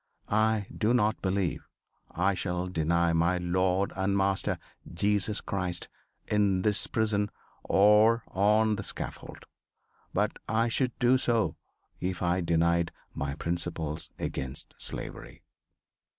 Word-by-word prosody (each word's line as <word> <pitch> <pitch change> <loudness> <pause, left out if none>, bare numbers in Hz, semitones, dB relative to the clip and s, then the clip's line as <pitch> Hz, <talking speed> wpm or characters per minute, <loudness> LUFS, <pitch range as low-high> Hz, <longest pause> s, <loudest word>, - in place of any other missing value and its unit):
I 110 -1 +2
do 115 +3 +2
not 110 -1 +1
believe 95 -2 -1 0.4
I 95 +4 +1
shall 90 -1 -2
deny 85 -1 +1
my 85 +2 +2
Lord 90 +2 +1
and 100 +1 +1
Master, 95 0 +1 0.3
Jesus 100 +3 +1
Christ, 90 -3 -3 0.4
in 100 -3 +2
this 105 -2 +1
prison 105 -2 +1 0.3
or 105 +4 +5
on 105 +2 +3
the 100 - -4
scaffold. - - -7 0.7
But - - 0
I 115 +1 +2
should 125 +1 0
do 125 +1 +4
so 115 -4 +1 0.4
if 90 0 -2
I 90 +1 +2
denied 85 0 +2 0.2
my 70 0 -3
principles 85 -2 -3
against 65 +1 -5
slavery." - - -5
95 Hz, 120 wpm, -29 LUFS, 85-105 Hz, 0.7 s, or